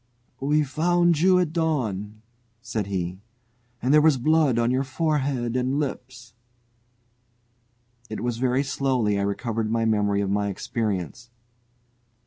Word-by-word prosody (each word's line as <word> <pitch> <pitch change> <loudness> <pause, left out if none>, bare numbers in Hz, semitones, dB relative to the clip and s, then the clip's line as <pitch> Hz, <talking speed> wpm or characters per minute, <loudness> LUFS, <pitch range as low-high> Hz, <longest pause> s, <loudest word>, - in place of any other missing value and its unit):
"We 150 +3 +2
found 170 +3 +2
you 185 +2 +5
at 175 -4 0
dawn," 110 - -2 0.4
said 115 -4 -4
he, 90 -2 -3 0.6
"and 130 +3 +2
there 150 - +7
was 155 -3 +4
blood 150 -1 +2
on 120 +1 +2
your 130 +1 +1
forehead 135 -4 -1
and 130 +3 0
lips." 125 -4 -6 1.8
It 110 - -5
was 120 -1 -2
very 130 +2 +1
slowly 130 -7 0
I - - 0
recovered 110 +2 -2
my 115 0 0
memory 105 -2 +1
of 100 -1 -1
my 100 0 0
experience. 110 - -4
125 Hz, 130 wpm, -24 LUFS, 110-145 Hz, 1.8 s, there